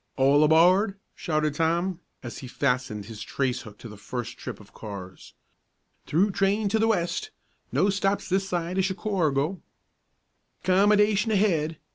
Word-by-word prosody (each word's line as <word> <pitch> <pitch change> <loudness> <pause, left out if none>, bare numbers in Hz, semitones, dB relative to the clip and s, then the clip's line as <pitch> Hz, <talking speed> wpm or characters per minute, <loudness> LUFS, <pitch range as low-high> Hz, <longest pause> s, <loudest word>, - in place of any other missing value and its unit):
"All 140 +2 +5
aboard!" 180 +6 +4 0.2
shouted 155 -3 -1
Tom, 170 +3 0 0.2
as 120 - -7
he 130 - -8
fastened 125 -6 -1
his 105 0 -9
trace 125 +3 -2
hook 105 -2 -12
to - - -10
the 105 -2 -11
first 120 +3 -6
trip - - -7
of - - -17
cars. 95 -3 -9 0.7
"Through 190 +7 +2
train 200 +2 +1
to 220 +2 +1
the 225 - +3
West! 220 - -1 0.4
No 200 - +2
stops 195 0 0
this 195 +1 0
side 175 +1 -2
o' - - +5
Chicorgo!" 185 -5 -1 1.0
"'Commodation 205 +3 +3
ahead! 170 -7 +1
170 Hz, 145 wpm, -26 LUFS, 135-195 Hz, 1.0 s, All